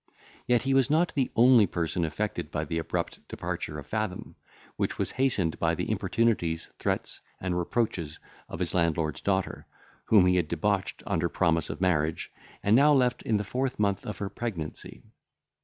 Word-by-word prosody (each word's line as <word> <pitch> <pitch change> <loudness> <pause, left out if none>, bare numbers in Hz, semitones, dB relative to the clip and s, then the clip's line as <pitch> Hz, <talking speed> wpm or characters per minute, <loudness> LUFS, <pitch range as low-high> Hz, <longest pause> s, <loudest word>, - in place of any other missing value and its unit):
Yet 120 -2 +3
he 135 0 +1
was 135 0 +3
not 165 +3 +2
the 135 -3 +1
only 120 -3 +6
person 85 0 -1
affected 85 -1 -3
by 75 +2 -2
the 80 +2 -2
abrupt 80 - -3
departure 75 - -4
of 70 - -7
Fathom, 110 0 -3 0.4
which - - -2
was - - -1
hastened 115 -11 0
by - - +2
the - - -2
importunities, 105 -9 0
threats, - - -2 0.2
and 90 -1 -2
reproaches 90 -4 -1 0.3
of - - -6
his - - -2
landlord's 80 -3 0
daughter, 95 -1 -1 0.4
whom 105 -5 +6
he 90 0 +4
had 85 -3 +1
debauched 95 +4 -1
under 85 +1 0
promise 80 -4 +1
of - - -6
marriage, 80 -4 0 0.3
and 100 +2 +4
now 145 +4 +6
left 125 -3 +2
in 110 - +1
the 105 - -2
fourth 130 +5 -2
month 100 -2 0
of 105 - -4
her 100 - -3
pregnancy. 95 -12 -6
95 Hz, 175 wpm, -28 LUFS, 80-115 Hz, 0.4 s, only